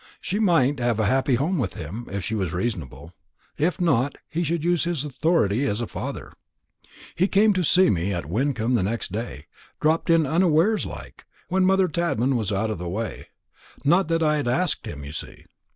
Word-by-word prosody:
She 200 +4 -2
might 160 - +3
have 120 -2 0
a 110 - +2
happy 130 +3 +2
home 160 +8 0
with 100 -8 -2
him, 95 +9 -7
if 100 -1 -3
she 110 - -3
was 95 -6 -2
reasonable. 90 - -4 0.5
If 170 +6 +1
not, 145 -6 +1
he 170 +2 -2
should 165 0 -1
use 175 -1 +2
his 165 -5 -1
authority 140 - +1
as 105 -2 -1
a 120 - -1
father. - - -6 0.8
"He 185 - +2
came 210 +2 +4
to 185 -1 0
see 185 +4 +4
me 90 +1 -1
at 85 -5 -3
Wyncomb 120 - 0
next 110 0 -3
day 105 -8 -5 0.3
dropped 160 +2 +1
in 165 -2 +5
unawares 170 +6 +2
like, - - -10 0.2
when 185 0 +2
mother 190 -1 +4
Tadman 150 -7 0
was 110 -4 -1
out 105 +3 0
of 105 - -4
the 90 0 -4
way 105 +3 -4 0.6
not 175 +5 +4
that 165 0 +1
I 150 -1 +3
had 145 -4 -2
asked 135 +10 0
him, 70 -1 -7
you 70 - -7
see. - - -9
135 Hz, 195 wpm, -24 LUFS, 105-170 Hz, 0.8 s, in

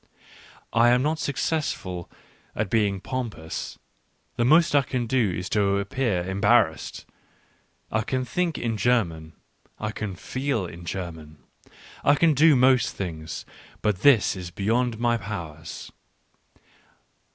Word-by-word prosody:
I 115 +1 +5
am 125 +1 +3
not 155 +2 0
successful 135 - -2 0.5
at 105 -3 -2
being 100 -4 +1
pompous, 115 -12 -5 0.6
the 120 - +1
most 155 +7 +5
I 145 - +6
can 130 -2 -2
do 120 -3 +2
is 90 0 -3
to 100 -2 +2
appear 100 -3 -1
embarrassed.... 100 +2 +1 0.9
I 110 - +1
can 130 +3 -2
think 175 +3 -1
in 115 -2 -2
German, 85 -10 0 0.5
I 110 0 -2
can 105 -3 -5
feel 130 0 -2
in 85 0 -9
German 80 -4 -6 0.3
— - - -26 0.3
I 145 - +5
can 160 +1 +4
do 150 +2 +6
most 130 -1 +3
things; 80 -4 -5 0.4
but 100 -4 0
this 130 -8 +5
is 90 -2 -6
beyond 115 +6 0
my 120 0 +1
powers. 85 -7 -7
110 Hz, 130 wpm, -25 LUFS, 90-130 Hz, 0.9 s, I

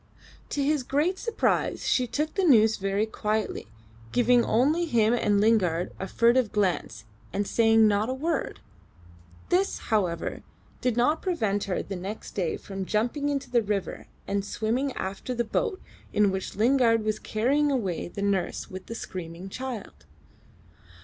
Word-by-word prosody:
To 285 - -1
his 295 0 +2
great 300 +9 0
surprise 460 - 0
she 250 -1 +2
took 300 +6 -2
the 390 - 0
news 220 -9 +5
very 195 +2 0
quietly, 215 0 -2 0.4
giving 245 0 +4
only 295 +9 +2
him 230 -7 +3
and 210 -4 +2
Lingard 185 -6 +2
a 190 - -3
furtive 235 +2 +3
glance, 195 -4 -1 0.3
and 205 +1 -1
saying 225 0 +4
not 210 +2 +1
a - - 0
word. 315 +2 -2 0.9
This, 380 +2 +2 0.2
however, 180 -6 0 0.4
did 245 -2 0
not 300 +7 +2
prevent 220 - 0
her 190 -2 -2
the 195 - -6
next 195 +4 -6
day 180 -5 -1
from 195 -1 -6
jumping 240 +9 0
into 275 -3 -3
the 240 -2 +4
river 205 -3 -3 0.2
and 200 0 -1
swimming 235 +7 -1
after 195 +6 -4
the 240 - +1
boat 390 - -1 0.3
in 205 -2 +3
which 190 0 -4
Lingard 230 0 +3
was 215 0 0
carrying 275 +7 +1
away 200 -10 -1
the 200 +3 -5
nurse 195 -3 -1
with 185 0 -8
the 230 - -6
screaming 180 -2 -7
child. 215 - -7
220 Hz, 155 wpm, -27 LUFS, 200-260 Hz, 0.9 s, news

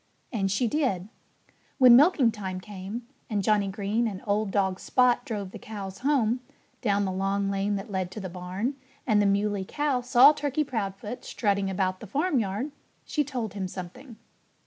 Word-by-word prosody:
And 195 -4 0
she 200 +5 +1
did. 220 - 0 0.7
When 250 -3 +8
milking 280 -3 +5
time 190 -4 -5
came, 205 +4 -7 0.2
and 205 -3 0
Johnnie 205 0 +2
Green 205 +4 -1
and 195 -4 -6
old 205 0 +1
dog 190 -1 0
Spot 250 -1 +3
drove 205 -5 -4
the - - -9
cows 195 -3 -7
home, 255 -4 +2 0.4
down 205 -3 +1
the 190 - -1
long 195 +1 0
lane 200 +1 0
that 195 +1 -6
led 185 -2 -1
to 215 - -6
the 190 - -5
barn, 185 +8 -3 0.3
and 215 -4 +3
the 205 - +3
Muley 200 0 +1
Cow 280 +4 -1
saw 250 +3 +7
Turkey 295 0 -1
Proudfoot 210 -3 -4
strutting 200 -3 0
about 185 -1 -1
the 220 - -9
farmyard, 260 - 0 0.3
she 300 - 0
told 245 -7 -4
him 195 -2 -3
something. 215 +8 -9
205 Hz, 170 wpm, -27 LUFS, 195-245 Hz, 0.7 s, When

